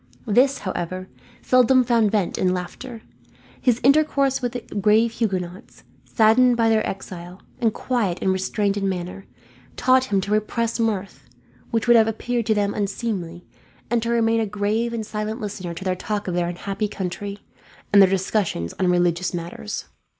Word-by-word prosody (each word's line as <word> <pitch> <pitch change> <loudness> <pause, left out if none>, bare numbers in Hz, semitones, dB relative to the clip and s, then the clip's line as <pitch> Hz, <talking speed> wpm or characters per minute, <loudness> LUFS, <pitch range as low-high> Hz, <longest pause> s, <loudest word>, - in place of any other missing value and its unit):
This, 260 +6 +3
however, 185 0 -4 0.3
seldom 255 0 +5
found 230 -3 +3
vent 200 -4 0
in 185 0 +2
laughter. 220 +6 -7 0.6
His 245 -2 +2
intercourse 275 -1 +3
with 245 -1 -2
the 245 - -4 0.2
grave 215 +3 +3
Huguenots, 190 -5 -4 0.2
saddened 235 +2 +4
by 225 -1 +3
their 220 -1 +3
exile, 180 -1 -8 0.2
and 230 -3 +2
quiet 215 -7 -1
and 190 - +1
restrained 200 +2 -1
in 195 -1 0
manner, 180 +1 -5 0.5
taught 255 0 +4
him 200 -6 +1
to 200 - -5
repress 225 +2 0
mirth, 205 -4 -2 0.4
which 225 -2 0
would 240 0 +7
have 225 -1 +5
appeared 235 +1 -2
to 220 - +3
them 205 -1 0
unseemly; 195 -4 -3 0.5
and 235 -1 +2
to 230 - -2
remain 230 -1 +2
a 220 - 0
grave 210 +3 -1
and 230 -2 -3
silent 215 +2 -4
listener 195 -5 -5
to 180 - -7
their 185 -1 0
talk 205 +2 -4
of 180 - -2
their 175 0 0
unhappy 195 +4 -3
country, 200 +1 -5 0.6
and 200 - +8
their 190 - +7
discussions 190 - -1
on 185 - +2
religious 175 0 +1
matters. 175 +5 -5
210 Hz, 165 wpm, -23 LUFS, 185-230 Hz, 0.6 s, and